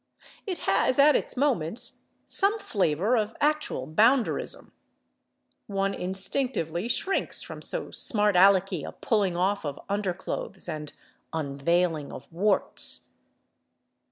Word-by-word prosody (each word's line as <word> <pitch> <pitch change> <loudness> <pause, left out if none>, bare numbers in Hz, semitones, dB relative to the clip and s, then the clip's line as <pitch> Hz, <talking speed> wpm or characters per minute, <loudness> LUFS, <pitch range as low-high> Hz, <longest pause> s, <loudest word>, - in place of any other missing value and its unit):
It 370 -3 -2
has, 195 +6 +2
at 285 +1 +6
its - - -2
moments, 240 - -1 0.2
some 415 0 +2
flavor 200 - 0
of 220 -1 -1
actual 300 - 0
bounderism: 225 - +1 1.0
one 195 -1 -1
instinctively 190 - -1
shrinks 385 +10 +1
from - - -9
so - - -2
smart 210 -2 +3
alecky 190 -3 +4
a - - -7
pulling 200 -6 0
off 195 +3 0
of 145 -2 -5
underclothes 195 -1 -4
and 155 -3 -5 0.4
unveiling 160 +1 -1
of 140 - -10
warts. 195 +3 +1
195 Hz, 110 wpm, -27 LUFS, 170-235 Hz, 1.0 s, at